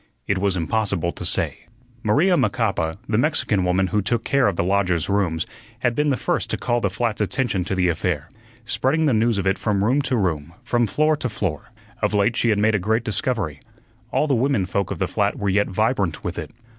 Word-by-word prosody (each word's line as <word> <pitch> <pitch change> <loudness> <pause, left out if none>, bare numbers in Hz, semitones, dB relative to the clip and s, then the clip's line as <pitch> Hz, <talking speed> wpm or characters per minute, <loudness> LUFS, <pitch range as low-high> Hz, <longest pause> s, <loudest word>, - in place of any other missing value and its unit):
It 100 - 0
was 95 -1 +1
impossible 90 0 0
to - - -8
say. - - -1 0.3
Maria 155 - +3
Macapa, 100 - 0
the 110 0 +1
Mexican 125 - +1
woman 90 +1 +2
who 105 +3 0
took 115 +3 -1
care 140 -2 +2
of 100 - 0
the - - 0
lodgers' 90 -3 +1
rooms, 90 -5 +1 0.4
had 120 -1 +2
been 150 +3 +1
the 135 - +1
first - - -1
to - - -1
call 120 0 0
the 100 - +1
flat's 110 +3 -2
attention 105 -2 0
to 95 - -2
the 90 -1 +2
affair, 85 -2 -1 0.3
spreading 150 +7 +1
the 145 - +3
news 115 0 +2
of 100 - -1
it 95 +1 +1
from 100 -3 0
room 130 +7 +3
to 130 -2 0
room, 85 -5 -1
from 120 -1 +1
floor 155 +7 +2
to 125 - -2
floor. 95 -8 -3 0.3
Of - - +1
late 105 +3 +2
she 115 - +1
had 105 - +3
made 110 +2 +3
a 105 - +2
great 110 +5 0
discovery; 110 - -1 0.5
all - - +2
the 145 - +1
women 130 -5 +2
folk 100 +1 -1
of - - -3
the - - 0
flat - - 0
were 100 - -1
yet 100 +2 +2
vibrant 100 - 0
with 90 0 -3
it. 80 - -6
105 Hz, 220 wpm, -22 LUFS, 90-120 Hz, 0.5 s, Maria